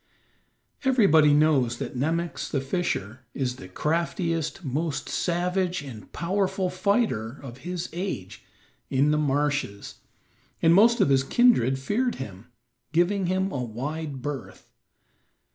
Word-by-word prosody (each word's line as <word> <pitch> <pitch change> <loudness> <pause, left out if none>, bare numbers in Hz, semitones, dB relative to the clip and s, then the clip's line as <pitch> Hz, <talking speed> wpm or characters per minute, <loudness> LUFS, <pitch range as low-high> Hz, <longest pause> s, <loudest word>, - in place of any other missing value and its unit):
Everybody 195 - +5
knows 145 -5 +3
that - - -5
Nemox, 165 +6 -1
the 140 - 0
fisher, 135 - -2 0.2
is 125 -2 -2
the 95 - -10
craftiest, 165 - -1
most 145 +1 -2
savage 180 -1 -1
and 120 -7 -10
powerful 190 +1 -1
fighter 185 - 0
of 125 -1 -9
his 175 +3 -4
age 170 - -5 0.5
in 140 +2 +3
the 150 - +2
marshes, 145 -7 -1 0.6
and 165 0 +5
most 230 +5 +5
of 170 - +4
his 135 -1 +4
kindred 135 - +4
feared 235 - 0
him, 100 -5 -8 0.4
giving 175 +4 +2
him 190 +1 0
a 130 -6 -2
wide 135 +4 -5
berth. 145 -2 -6
155 Hz, 125 wpm, -26 LUFS, 135-180 Hz, 0.6 s, Everybody